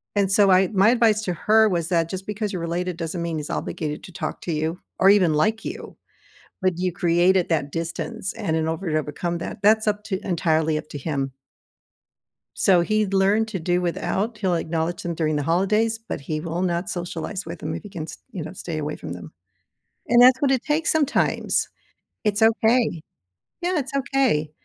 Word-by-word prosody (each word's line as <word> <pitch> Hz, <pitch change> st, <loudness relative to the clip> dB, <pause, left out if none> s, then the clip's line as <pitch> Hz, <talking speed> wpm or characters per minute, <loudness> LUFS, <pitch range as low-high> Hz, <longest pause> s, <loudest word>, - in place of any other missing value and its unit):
and, 200 Hz, -1 st, +2 dB
so 200 Hz, 0 st, +5 dB
my 185 Hz, 0 st, +5 dB
my 195 Hz, +3 st, +5 dB
advice 225 Hz, -3 st, +3 dB
to 180 Hz, -, -1 dB
her 220 Hz, +4 st, +4 dB
was 170 Hz, -3 st, -1 dB
that 165 Hz, -2 st, +1 dB
just 190 Hz, +1 st, -6 dB
because 210 Hz, 0 st, -3 dB
you're 180 Hz, -, -4 dB
related 175 Hz, +1 st, -2 dB
doesn't 170 Hz, +1 st, -4 dB
mean 165 Hz, -2 st, -2 dB
he's 150 Hz, -, -5 dB
obligated 150 Hz, -2 st, -4 dB
to -, -, -10 dB
talk 175 Hz, -, -5 dB
to 170 Hz, -, -4 dB
you 160 Hz, +3 st, -2 dB, 0.2 s
or 195 Hz, -, +6 dB
even 185 Hz, -6 st, +5 dB
like 215 Hz, +9 st, +1 dB
you. -, -, -7 dB, 0.7 s
But 185 Hz, -2 st, +1 dB
you 180 Hz, 0 st, 0 dB
created 175 Hz, +2 st, +2 dB
that 145 Hz, -3 st, 0 dB
distance 185 Hz, +5 st, -4 dB
and 200 Hz, -8 st, -2 dB
in 160 Hz, 0 st, 0 dB
over 165 Hz, +3 st, -3 dB
to 155 Hz, -1 st, +1 dB
become 170 Hz, +4 st, -3 dB
that 205 Hz, -, -6 dB
that's 215 Hz, +2 st, +4 dB
up 210 Hz, 0 st, 0 dB
to 190 Hz, -3 st, -2 dB
entirely 160 Hz, -3 st, +1 dB
up 155 Hz, 0 st, -6 dB
to -, -, -6 dB
him. 140 Hz, -2 st, -3 dB, 1.2 s
So, 180 Hz, -3 st, +4 dB
he 215 Hz, +3 st, +1 dB
learned 195 Hz, +3 st, +2 dB
to 190 Hz, -4 st, -4 dB
do 175 Hz, +2 st, 0 dB
without, 200 Hz, +5 st, -2 dB
he'll 185 Hz, -4 st, 0 dB
acknowledge 165 Hz, +1 st, -2 dB
them 170 Hz, -1 st, -2 dB
during 155 Hz, -2 st, 0 dB
the 145 Hz, -, -1 dB
holidays, 210 Hz, +7 st, +1 dB
but 225 Hz, -8 st, -6 dB
he 155 Hz, +2 st, -4 dB
will 170 Hz, +1 st, -3 dB
not 175 Hz, 0 st, -1 dB
socialize 175 Hz, +2 st, -4 dB
with -, -, -7 dB
them -, -, -4 dB
if -, -, -6 dB
he 205 Hz, -, -9 dB
can 165 Hz, -5 st, -6 dB
st -, -, -9 dB
you 175 Hz, -5 st, -5 dB
know, 155 Hz, -, -7 dB
stay 170 Hz, -3 st, -5 dB
away 150 Hz, 0 st, -3 dB
from 85 Hz, -, -7 dB
them. 85 Hz, -3 st, -9 dB, 0.8 s
And 240 Hz, +1 st, +6 dB
that's 255 Hz, +1 st, +7 dB
what 275 Hz, -2 st, +3 dB
it 260 Hz, -1 st, +1 dB
takes 310 Hz, +2 st, +1 dB
sometimes. 295 Hz, -3 st, +1 dB, 0.6 s
It's 210 Hz, 0 st, 0 dB
okay. 225 Hz, -5 st, +3 dB, 0.6 s
Yeah, 355 Hz, 0 st, 0 dB
it's 275 Hz, -2 st, -4 dB
okay. 265 Hz, -, +1 dB
180 Hz, 200 wpm, -23 LUFS, 165-215 Hz, 1.2 s, that's